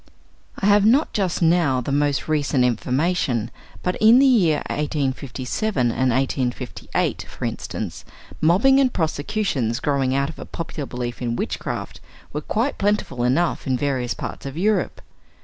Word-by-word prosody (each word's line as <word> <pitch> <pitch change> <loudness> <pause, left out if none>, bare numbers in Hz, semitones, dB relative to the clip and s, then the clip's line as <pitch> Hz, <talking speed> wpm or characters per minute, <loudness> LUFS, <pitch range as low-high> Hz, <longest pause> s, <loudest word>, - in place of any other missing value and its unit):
I - - -2
have 205 0 +5
not 255 +9 +3
just 185 -4 0
now 165 -6 +3
the 125 +3 -4
most 145 -1 +1
recent 145 -4 +1
information, 125 - 0 0.3
but 180 - -1
in 220 +3 +7
the 275 - +6
year 185 - +3
1857 140 - -1
and 130 +2 +1
1858, 125 0 -1
for - - -6
instance, - - -5 0.4
mobbing 205 - +5
and 265 -2 +3
prosecutions 155 - -1
growing 135 -2 0
out 140 +1 +1
of 165 - -10
a - - -7
popular 155 -4 -5
belief 120 -1 -5
in 120 -1 -1
witchcraft - - -4 0.3
were 150 - -2
quite 235 - -1
plentiful 200 -12 0
enough 140 +8 +1
in 130 -1 +1
various 130 -3 -1
parts - - -6
of 135 +3 -7
Europe. 210 +4 0
145 Hz, 150 wpm, -22 LUFS, 130-190 Hz, 0.4 s, in